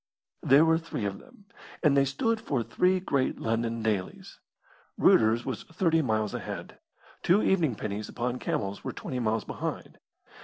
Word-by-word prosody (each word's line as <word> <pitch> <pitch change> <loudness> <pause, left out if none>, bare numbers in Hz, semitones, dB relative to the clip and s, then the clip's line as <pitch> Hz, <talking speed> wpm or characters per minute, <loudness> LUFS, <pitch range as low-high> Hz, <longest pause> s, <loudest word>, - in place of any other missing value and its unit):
There 140 +4 +6
were 160 0 +3
three 165 -10 -5
of 100 -1 -3
them, 205 - -19 0.4
and 150 -3 +4
they 140 0 +4
stood 220 - -1
for 130 -5 -1
three 185 +9 +2
great 140 -8 -1
London 115 0 -1
dailies. 105 -4 -3 0.6
Reuter's 115 +2 +4
was 130 -5 -3
thirty 165 -1 +1
miles 110 -6 0
ahead; - - -6 0.4
two 190 +5 +3
evening 165 - +2
pennies 105 0 -5
upon 125 +1 -3
camels 100 0 -3
were - - -4
twenty 125 - -5
miles 110 -2 0
behind. - - -6
125 Hz, 155 wpm, -28 LUFS, 110-160 Hz, 0.6 s, There